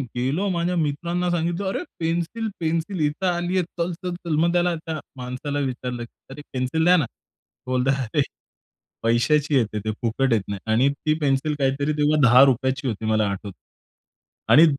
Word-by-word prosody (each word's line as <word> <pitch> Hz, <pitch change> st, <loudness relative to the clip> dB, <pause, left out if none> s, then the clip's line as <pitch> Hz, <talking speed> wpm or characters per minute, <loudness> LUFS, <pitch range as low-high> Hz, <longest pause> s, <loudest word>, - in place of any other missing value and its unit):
गेलो 135 Hz, +11 st, 0 dB
माझ्या 175 Hz, 0 st, 0 dB
मित्रांना 170 Hz, +4 st, -1 dB
सांगितलं 175 Hz, +3 st, -1 dB
"अरे 190 Hz, -, -1 dB, 0.2 s
पेन्सिल, 170 Hz, +7 st, -1 dB
पेन्सिल 165 Hz, +3 st, -1 dB
इथे 150 Hz, +6 st, -4 dB
आलीये 175 Hz, +1 st, +1 dB
चल, 175 Hz, +1 st, -3 dB
चल, 180 Hz, +1 st, -5 dB
चल." 170 Hz, -3 st, -3 dB
मग 170 Hz, +1 st, +3 dB
त्याला 175 Hz, 0 st, +2 dB
त्या 160 Hz, -1 st, -5 dB, 0.2 s
माणसाला 125 Hz, +3 st, -4 dB
विचारलं 125 Hz, -1 st, -4 dB, 0.3 s
"अरे 135 Hz, +2 st, -9 dB
एक 145 Hz, -, -11 dB
पेन्सिल 130 Hz, +5 st, 0 dB
द्याना." 175 Hz, -5 st, +5 dB, 0.6 s
बोलतात 130 Hz, +2 st, +1 dB
"अरे! 145 Hz, -, +5 dB, 0.8 s
पैशाची 140 Hz, +6 st, +2 dB
येते 110 Hz, -4 st, +1 dB
ती 110 Hz, +1 st, -2 dB
फुकट 120 Hz, +2 st, +1 dB
येत 110 Hz, -, +2 dB
नाही." 100 Hz, -1 st, -4 dB
आणि 125 Hz, +5 st, +4 dB
ती 150 Hz, +2 st, -1 dB
पेन्सिल 145 Hz, +1 st, +1 dB
काहीतरी 140 Hz, +2 st, +1 dB
तेव्हा 150 Hz, +1 st, +3 dB
₹10ची 130 Hz, +2 st, +5 dB
होती 110 Hz, -2 st, -3 dB
मला 110 Hz, -1 st, +2 dB
आठवतं. 100 Hz, -1 st, -6 dB, 0.9 s
आणि 155 Hz, -, +9 dB
145 Hz, 160 wpm, -23 LUFS, 125-170 Hz, 0.9 s, आणि